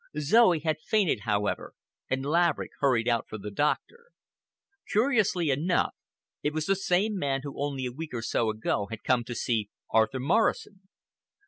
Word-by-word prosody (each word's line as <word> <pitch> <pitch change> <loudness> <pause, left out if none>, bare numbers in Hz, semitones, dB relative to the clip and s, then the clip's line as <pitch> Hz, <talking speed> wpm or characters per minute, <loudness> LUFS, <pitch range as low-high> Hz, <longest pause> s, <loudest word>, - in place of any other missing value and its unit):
Zoe 180 +4 +5
had 155 0 -1
fainted, 195 - +1
however, 105 -2 -1 0.3
and 135 +1 -1
Laverick 170 +2 +1
hurried 125 -5 +2
out 115 -1 0
for 110 - -6
the 105 0 -7
doctor. 150 - -1 0.8
Curiously 210 - +2
enough, 165 +7 +1 0.5
it 150 - -1
was 155 0 -2
the 195 - +2
same 195 +3 +1
man 135 -3 0
who 140 -1 -6
only 140 -3 -2
a 125 - -3
week 155 -1 -6
or 115 - -3
so 115 0 0
ago 105 -1 -1
had 115 -1 -7
come 125 -2 +2
to 120 - -6
see 110 -3 -1 0.2
Arthur 110 +4 +2
Morrison. 190 - 0
145 Hz, 160 wpm, -28 LUFS, 120-180 Hz, 0.8 s, Zoe